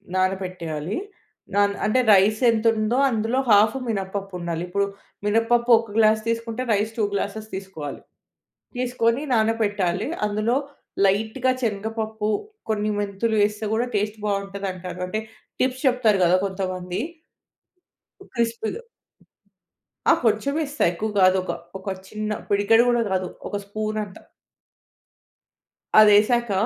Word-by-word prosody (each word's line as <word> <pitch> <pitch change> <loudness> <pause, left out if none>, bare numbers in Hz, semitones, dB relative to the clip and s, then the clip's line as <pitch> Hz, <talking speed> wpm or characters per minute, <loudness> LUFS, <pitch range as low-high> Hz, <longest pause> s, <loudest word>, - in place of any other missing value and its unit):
నానపెట్టేయాలి. 185 -3 -2 0.6
Non 200 0 +3
అంటే 235 +4 +2
rice 205 +3 +4
ఎంతుందో 225 +1 +1
అందులో 225 +2 0
½ 210 +4 +5
మినపప్పు 195 -1 -3
ఉండాలి. 170 -1 -3
ఇప్పుడు 200 +3 0 0.4
మినపప్పు 230 +3 +2
ఒక 225 -2 -8
గ్లాస్ 215 0 +4
తీసుకుంటే, 230 +1 -2
రైస్ 210 +2 0
2 220 - +1
గ్లాస్సెస్ 215 +2 -3
తీసుకోవాలి. 190 -7 -7 0.8
తీసుకొని 245 0 +1
నానపెట్టాలి. 210 -4 +1 0.2
అందులో 215 +3 0 0.5
లైట్‌గా 220 +6 +1
చనగపప్పు 220 0 -2 0.4
కొన్ని 215 -1 0
మెంతులు 205 +2 -1
ఏస్తే, 210 +1 -6
కూడా 240 +3 +1
టేస్ట్ 210 +1 -1
బాగుంటుందంటారు. 195 -3 -4
అంటే 215 +4 -2 0.4
టిప్స్ 255 0 0
చెప్తారు 230 -6 +3
గదా! 180 +1 +5
కొంతమంది. 185 -1 -3 1.3
క్రిస్పీగా. 230 - -2 1.3
ఆ! - - +9
కొంచెం 225 +6 +2
ఏస్తా. 285 0 -2
ఎక్కువ 215 +5 -3
కాదు. 185 0 +5
ఒక - - -3 0.3
ఒక 190 - -15 0.2
చిన్న 215 +1 -3
పిడికెడు 205 +3 +4
కూడా 240 -1 +2
కాదు 185 -1 0 0.2
ఒక - - -4
స్పూన్ 215 +1 -3
అంత. 190 - -13 1.8
అది 215 -1 +8
ఏసాక 235 +1 +1
215 Hz, 115 wpm, -23 LUFS, 195-225 Hz, 1.8 s, ఆ